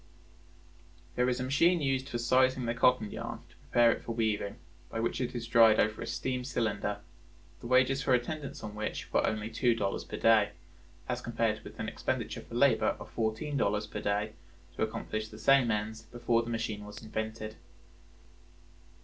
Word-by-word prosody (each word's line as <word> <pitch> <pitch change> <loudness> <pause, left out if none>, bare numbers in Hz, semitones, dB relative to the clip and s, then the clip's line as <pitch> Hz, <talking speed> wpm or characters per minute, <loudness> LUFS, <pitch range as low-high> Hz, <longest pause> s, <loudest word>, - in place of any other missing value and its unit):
There 125 +7 +2
is 125 0 -1
a - - -1
machine 165 +7 +3
used 135 -2 0
for 120 - -2
sizing 130 +1 +3
the 115 - 0
cotton 120 -2 +3
yarn - - -6
to - - -22
prepare 120 -1 +3
it - - -3
for 115 - -5
weaving, 110 -3 -1 0.3
by 115 - -4
which 115 +3 -1
it 125 0 -3
is 120 -1 -3
dried 115 -2 +6
over 110 0 +1
a - - -4
steam 130 -1 -2
cylinder, 105 -5 -2 0.6
the 120 - -8
wages 130 +2 +4
for 130 -2 +3
attendance 140 +3 -4
on 105 -1 -6
which 105 0 -5
were - - +3
only 110 +1 -2
two 120 +1 +2
dollars 100 -3 -2
per - - -7
day, 110 -2 +4 0.5
as 125 0 -2
compared 115 -3 -1
with - - -11
an - - -2
expenditure - - -3
for - - -10
labor - - +3
of - - -10
fourteen 115 +7 -1
dollars 105 -3 +1
per 105 0 -6
day 105 +1 -1 0.4
to - - -6
accomplish 110 0 -2
the 110 - -12
same 135 0 +4
ends 110 +1 -2
before 120 0 0
the 115 - -6
machine 110 -2 -3
was 105 +2 -10
invented. 110 0 -5
115 Hz, 185 wpm, -31 LUFS, 110-125 Hz, 0.6 s, dried